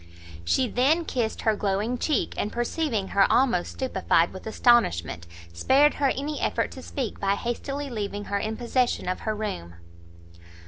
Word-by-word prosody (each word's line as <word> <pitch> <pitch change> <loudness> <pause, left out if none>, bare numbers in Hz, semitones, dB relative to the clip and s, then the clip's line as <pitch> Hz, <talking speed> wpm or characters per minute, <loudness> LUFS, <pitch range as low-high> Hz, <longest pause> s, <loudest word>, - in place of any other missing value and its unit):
She 255 - +2
then 285 +9 +2
kissed 235 -6 -2
her 220 -1 +2
glowing 210 +5 -1
cheek, 300 -7 0
and 210 - -2
perceiving 240 -4 -1
her 195 -1 +3
almost 240 -9 +2
stupified 190 -9 +1
with 190 +3 -9
astonishment, 155 - +2 0.3
spared 275 - +4
her 280 -2 +1
any 290 +2 -3
effort - - 0
to - - -9
speak, 255 -6 -4
by 200 0 +1
hastily 275 +6 -4
leaving 205 -4 -4
her 200 0 -2
in 220 +2 -3
possession 245 -2 0
of 185 - -1
her 215 -1 -2
room. 85 - -5
225 Hz, 155 wpm, -26 LUFS, 200-260 Hz, 0.3 s, spared